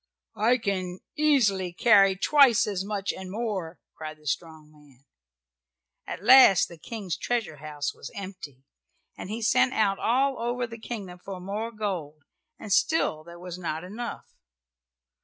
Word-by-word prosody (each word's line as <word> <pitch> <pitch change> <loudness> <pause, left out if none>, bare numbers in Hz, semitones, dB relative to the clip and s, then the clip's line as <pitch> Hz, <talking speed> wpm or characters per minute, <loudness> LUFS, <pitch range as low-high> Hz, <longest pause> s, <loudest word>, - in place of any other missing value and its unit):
"I 240 +3 +4
can 185 -5 -3
easily 210 - +2
carry 195 -1 +5
twice 260 +4 +5
as 195 -3 -2
much, 200 -1 -3
and 190 -1 -8
more," 195 -5 -4 0.2
cried 155 -1 -8
the 155 - -23
strong 155 +1 -4
man. 145 -3 -22 1.0
At 180 - -6
last 210 -6 +7
the 170 - -12
King's 200 -3 -5
treasure 230 -10 -2
house 145 0 -4
was - - -9
empty, 185 -9 -9 0.5
and - - -8
he 225 +2 -4
sent 255 +4 +3
out 200 -3 +2
all 265 +3 +1
over 240 +1 -1
the 230 -1 -10
kingdom 200 -6 -7
for 195 -2 -7
more 205 +5 -4
gold, 175 -9 -5 0.3
and 205 -3 -3
still 200 - +1
there 170 +1 -12
was 180 0 -8
not 160 -2 -4
enough. 220 +6 -6
195 Hz, 150 wpm, -26 LUFS, 170-230 Hz, 1.0 s, last